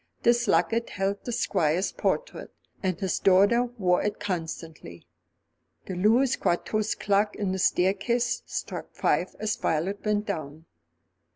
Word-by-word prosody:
This 240 Hz, 0 st, +3 dB
locket 230 Hz, +1 st, +2 dB
held 195 Hz, +1 st, -2 dB
the 245 Hz, -, -3 dB
Squire's 185 Hz, -5 st, +1 dB
portrait, -, -, -2 dB, 0.3 s
and 185 Hz, -3 st, -1 dB
his 190 Hz, -3 st, -1 dB
daughter 200 Hz, +6 st, +4 dB
wore 180 Hz, -3 st, +2 dB
it 210 Hz, 0 st, -2 dB
constantly. 160 Hz, -, -6 dB, 0.8 s
The 190 Hz, -, -5 dB
Louis 225 Hz, +8 st, +3 dB
Quatorze 215 Hz, +5 st, 0 dB
clock 205 Hz, +1 st, +1 dB
on 200 Hz, -3 st, -1 dB
the 190 Hz, -, -2 dB
staircase 200 Hz, +7 st, +1 dB
struck -, -, -5 dB
five -, -, 0 dB
as 215 Hz, -1 st, -1 dB
Violet 180 Hz, +6 st, -1 dB
went 210 Hz, -1 st, 0 dB
down. 160 Hz, -5 st, -5 dB
200 Hz, 130 wpm, -27 LUFS, 180-215 Hz, 0.8 s, daughter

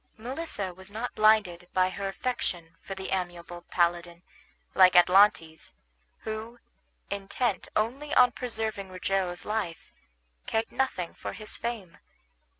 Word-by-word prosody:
Melissa 235 Hz, -, -4 dB
was 190 Hz, +2 st, -10 dB
not 225 Hz, +4 st, -4 dB
blinded 205 Hz, -5 st, +3 dB
by 185 Hz, 0 st, +3 dB
her 200 Hz, +1 st, -4 dB
affection 180 Hz, -6 st, -3 dB
for 195 Hz, -, -7 dB
the 190 Hz, 0 st, -6 dB
amiable 175 Hz, -2 st, -4 dB
paladin, 175 Hz, 0 st, 0 dB, 0.5 s
like 185 Hz, -1 st, +6 dB
Atlantes, 175 Hz, -, +4 dB, 0.5 s
who, 220 Hz, +2 st, -5 dB, 0.5 s
intent 200 Hz, +3 st, -1 dB
only 260 Hz, +8 st, -1 dB
on 250 Hz, -1 st, +7 dB
preserving 220 Hz, -5 st, -3 dB
Rogero's 185 Hz, -1 st, -2 dB
life, 210 Hz, -6 st, -3 dB, 0.6 s
cared 225 Hz, 0 st, -1 dB
nothing 250 Hz, -10 st, -1 dB
for -, -, -6 dB
his 215 Hz, -1 st, -7 dB
fame. 225 Hz, -7 st, -5 dB
195 Hz, 120 wpm, -28 LUFS, 175-220 Hz, 0.6 s, on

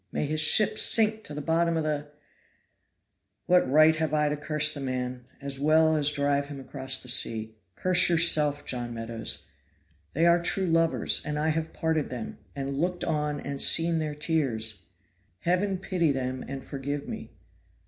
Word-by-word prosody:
may -, -, -2 dB
his 155 Hz, +1 st, +1 dB
ship 215 Hz, +7 st, +4 dB
sink 220 Hz, -1 st, +4 dB
to -, -, -10 dB
the 150 Hz, 0 st, -6 dB
bottom 165 Hz, +1 st, +1 dB
of 160 Hz, -, -1 dB
the. 150 Hz, -1 st, -3 dB, 1.4 s
What 180 Hz, -6 st, +3 dB
right 155 Hz, +3 st, +5 dB
have 155 Hz, -1 st, -1 dB
I 150 Hz, -1 st, +2 dB
to 150 Hz, -, -1 dB
curse 150 Hz, 0 st, +1 dB
the 145 Hz, -, -6 dB
man, 125 Hz, -2 st, -4 dB
as 140 Hz, -1 st, -7 dB
well 160 Hz, +2 st, +3 dB
as 150 Hz, -1 st, +1 dB
drive 140 Hz, -1 st, 0 dB
him 145 Hz, -1 st, -8 dB
across 135 Hz, 0 st, -2 dB
the -, -, -11 dB
sea? 110 Hz, -3 st, 0 dB, 0.2 s
Curse 180 Hz, -1 st, +2 dB
yourself, 155 Hz, -4 st, +3 dB
John 120 Hz, -2 st, -4 dB
Meadows. 115 Hz, 0 st, -5 dB, 0.7 s
They 165 Hz, +3 st, +1 dB
are 170 Hz, 0 st, +4 dB
true 190 Hz, +2 st, +1 dB
lovers, 165 Hz, -1 st, +2 dB
and 150 Hz, -1 st, -4 dB
I 155 Hz, +1 st, 0 dB
have 160 Hz, +1 st, -2 dB
parted 160 Hz, -2 st, -1 dB
them, 120 Hz, -3 st, -7 dB, 0.2 s
and 140 Hz, 0 st, -4 dB
looked 175 Hz, +1 st, -2 dB
on 150 Hz, -2 st, -2 dB
and 140 Hz, -1 st, -6 dB
seen 165 Hz, 0 st, +3 dB
their 155 Hz, -1 st, -3 dB
tears. 115 Hz, -, 0 dB, 0.5 s
Heaven 185 Hz, +3 st, 0 dB
pity 180 Hz, -4 st, 0 dB
them 130 Hz, -1 st, -3 dB
and 135 Hz, 0 st, -7 dB
forgive 140 Hz, +1 st, -5 dB
me. -, -, -7 dB
150 Hz, 170 wpm, -27 LUFS, 135-165 Hz, 1.4 s, right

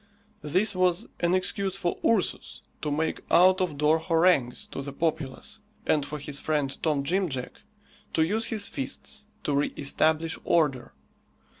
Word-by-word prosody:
This 185 Hz, +7 st, +1 dB
was 185 Hz, +3 st, +2 dB
an 175 Hz, +1 st, +2 dB
excuse 195 Hz, +1 st, -1 dB
for 175 Hz, -3 st, -2 dB
Ursus 220 Hz, -5 st, 0 dB, 0.2 s
to 150 Hz, -, -2 dB
make 155 Hz, +2 st, -1 dB
out 185 Hz, +2 st, +6 dB
of 165 Hz, -6 st, -1 dB
door 150 Hz, +2 st, +3 dB
harangues 160 Hz, -6 st, +2 dB
to -, -, -4 dB
the 140 Hz, 0 st, -6 dB
populace, 155 Hz, +3 st, -3 dB, 0.3 s
and 150 Hz, -2 st, +2 dB
for 150 Hz, +2 st, -5 dB
his 145 Hz, 0 st, -3 dB
friend 145 Hz, -3 st, -1 dB
Tom 150 Hz, -4 st, +1 dB
Jim 185 Hz, +5 st, +1 dB
Jack 130 Hz, -3 st, -6 dB, 0.5 s
to 160 Hz, -, +4 dB
use 220 Hz, +6 st, 0 dB
his 215 Hz, -3 st, -1 dB
fists 135 Hz, +9 st, -6 dB, 0.2 s
to 145 Hz, -, 0 dB
re 140 Hz, +1 st, +2 dB
establish 160 Hz, +3 st, +1 dB
order. 145 Hz, -7 st, +1 dB
160 Hz, 155 wpm, -27 LUFS, 145-185 Hz, 0.5 s, out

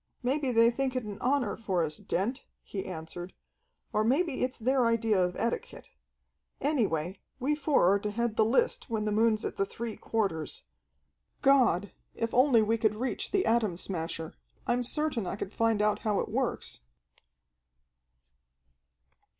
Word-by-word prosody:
"Maybe 270 Hz, +2 st, +1 dB
they 230 Hz, 0 st, +5 dB
think 260 Hz, +1 st, -1 dB
it 255 Hz, -, -1 dB
an 210 Hz, -1 st, -7 dB
honor 255 Hz, -5 st, +1 dB
for 190 Hz, -6 st, -1 dB
us, 155 Hz, -1 st, -2 dB
Dent," 230 Hz, +10 st, -2 dB, 0.2 s
he 195 Hz, -2 st, -5 dB
answered, 175 Hz, +1 st, -7 dB, 0.6 s
"or 215 Hz, -, +2 dB
maybe 275 Hz, +5 st, +1 dB
it's 255 Hz, +1 st, -1 dB
their 255 Hz, +1 st, +2 dB
idea 225 Hz, -4 st, +2 dB
of 180 Hz, 0 st, -1 dB
etiquette. 475 Hz, -, -3 dB, 0.7 s
Anyway, 195 Hz, -, 0 dB, 0.2 s
we 275 Hz, +4 st, +1 dB
four 285 Hz, -, +3 dB
are 200 Hz, -, +2 dB
to 210 Hz, -, -3 dB
head 235 Hz, +1 st, -1 dB
the 220 Hz, -, +4 dB
list 475 Hz, -, +1 dB
when 220 Hz, -2 st, -1 dB
the 210 Hz, -, 0 dB
moon's 215 Hz, 0 st, +2 dB
at -, -, -4 dB
the -, -, +2 dB
three 230 Hz, +1 st, -5 dB
quarters. 215 Hz, -, -2 dB, 0.8 s
God, 240 Hz, -, +4 dB, 0.2 s
if 230 Hz, 0 st, -2 dB
only 250 Hz, -3 st, +5 dB
we 225 Hz, +2 st, +1 dB
could 215 Hz, -1 st, +2 dB
reach 250 Hz, +4 st, -3 dB
the 390 Hz, -2 st, +1 dB
Atom 225 Hz, -6 st, +2 dB
Smasher, 165 Hz, -3 st, -4 dB, 0.3 s
I'm 245 Hz, +1 st, +1 dB
certain 250 Hz, -, -1 dB
I -, -, -2 dB
could 200 Hz, 0 st, -6 dB
find 225 Hz, -2 st, +2 dB
out 210 Hz, 0 st, +2 dB
how 210 Hz, -2 st, 0 dB
it -, -, -2 dB
works!" -, -, -2 dB
225 Hz, 160 wpm, -29 LUFS, 200-255 Hz, 0.8 s, they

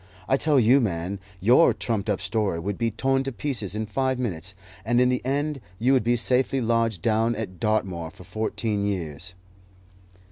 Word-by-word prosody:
I 135 Hz, -, +3 dB
tell 145 Hz, 0 st, +3 dB
you, 125 Hz, +4 st, +5 dB
man, 95 Hz, -2 st, -2 dB, 0.2 s
your 120 Hz, -, +5 dB
trumped 110 Hz, -3 st, -2 dB
up 100 Hz, -, +1 dB
story 95 Hz, -1 st, 0 dB
would 100 Hz, +4 st, -3 dB
be 115 Hz, -, +1 dB
torn 135 Hz, +5 st, 0 dB
to 135 Hz, -, -2 dB
pieces 115 Hz, -7 st, -3 dB
in 110 Hz, +1 st, -2 dB
five 130 Hz, +4 st, -1 dB
minutes, 95 Hz, -7 st, -4 dB, 0.3 s
and 120 Hz, +3 st, +2 dB
in 125 Hz, 0 st, +4 dB
the 125 Hz, 0 st, 0 dB
end 140 Hz, +2 st, -1 dB, 0.2 s
you 125 Hz, +6 st, +3 dB
would 130 Hz, -, +3 dB
be 120 Hz, +2 st, +2 dB
safely 125 Hz, +3 st, +2 dB
lodged 115 Hz, -4 st, 0 dB
down 115 Hz, +1 st, +2 dB
at 95 Hz, -6 st, -6 dB
Dartmoor 95 Hz, -6 st, -1 dB
for 90 Hz, -, -14 dB
fourteen 110 Hz, 0 st, -2 dB
years." 90 Hz, -3 st, -4 dB
110 Hz, 180 wpm, -25 LUFS, 100-125 Hz, 0.3 s, you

